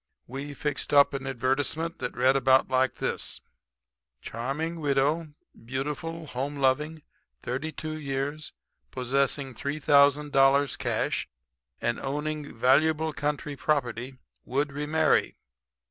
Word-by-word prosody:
"We 140 +3 -6
fixed 150 0 -3
up 140 0 +6
an 135 -1 -4
advertisement 135 +6 -1
that - - -4
read 130 +2 +4
about 130 0 +4
like 130 0 +2
this: - - -2 0.8
"Charming 140 - -4
widow, 145 +2 +1 0.3
beautiful, 150 +6 -4
home 135 +1 -4
loving, 150 +3 0 0.4
32 155 +4 -4
years, 140 +1 -3 0.4
possessing 135 +1 0
$3,000 140 0 +3
cash - - -1 0.5
and 120 0 -1
owning 150 0 -4
valuable 155 +6 +3
country 145 0 -2
property, 130 -3 -1 0.3
would 140 +3 -1
remarry. 150 +3 +1
140 Hz, 100 wpm, -27 LUFS, 135-150 Hz, 0.8 s, up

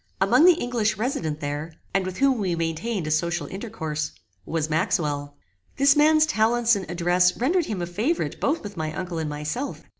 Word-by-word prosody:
Among 320 - +5
the 360 - +8
English 240 - -1
resident 170 - -2
there, 145 +3 -4 0.2
and 190 0 +1
with 185 - -5
whom 270 -3 +3
we 185 -4 0
maintained 165 +4 -2
a 155 - -2
social 170 0 0
intercourse, 160 -6 -4 0.3
was 160 -2 -1
Maxwell. 150 -3 -1 0.4
This 280 0 +5
man's 310 +1 +5
talents 235 -4 +2
and 190 -4 -5
address 180 +1 +2
rendered 320 +7 +1
him 190 -5 -3
a - - -1
favorite 220 - -2
both 310 +4 0
with 205 -1 -8
my 155 -2 -3
uncle 180 -3 -4
and 155 -1 -2
myself. 150 - -4
185 Hz, 180 wpm, -24 LUFS, 160-240 Hz, 0.4 s, the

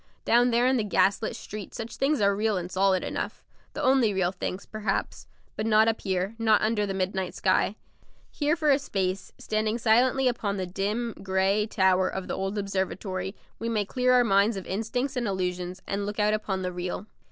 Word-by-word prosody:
Down 240 +1 +4
there 240 +1 +3
in 260 0 +3
the 225 - +1
gaslit 205 +1 +1
street 210 -2 -8
such 225 0 -6
things 275 -2 +1
are 200 0 +3
real 215 0 +1
and 180 0 -5
solid 190 0 +2
enough, - - -4 0.3
the - - -4
only 255 -6 +3
real 180 -2 +1
things, 185 0 -5
perhaps; 215 0 -3 0.3
but 215 - -2
not 220 0 +5
up 225 0 0
here, 190 +1 -1
not 220 -2 +4
under 215 -1 +1
the 195 - -3
midnight 190 -1 -2
sky. 190 +2 +2 0.6
Here 300 +1 +1
for 310 -3 +2
a 275 - +4
space, 190 -6 -2
standing 215 +1 -1
silently 250 +4 +3
upon 210 -5 -1
the 185 - -2
dim, 210 +6 -2
grey 195 +2 +1
tower 190 -3 +3
of 190 -1 -5
the - - -3
old 195 +2 -3
observatory, 190 -1 -3 0.2
we 230 - -2
may 215 -3 0
clear 255 +4 +1
our 250 -1 +6
minds 200 0 +3
of 190 - -6
instincts 245 +7 -2
and 245 -2 -1
illusions, 180 -1 -3
and 200 +1 -2
look 205 - -4
out 210 0 +3
upon 195 -3 -2
the 180 0 -3
real. 180 +3 -4
205 Hz, 200 wpm, -27 LUFS, 190-225 Hz, 0.6 s, our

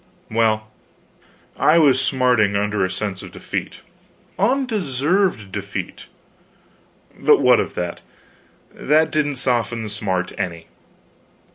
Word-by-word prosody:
Well, 110 -1 +1 0.9
I 155 - +4
was 140 -5 +4
smarting 125 -7 +2
under 105 0 0
a 95 - 0
sense 100 -1 -4
of - - -10
defeat. - - -5 0.6
Undeserved 185 - 0
defeat, 100 -2 -6 1.1
but - - +5
what - - +5
of - - -3
that? 90 -1 -4 0.7
That 155 +2 +2
didn't 145 -2 0
soften 120 -3 -1
the 110 - -5
smart 95 -3 -2
any. 85 -4 -4
115 Hz, 110 wpm, -21 LUFS, 100-145 Hz, 1.1 s, but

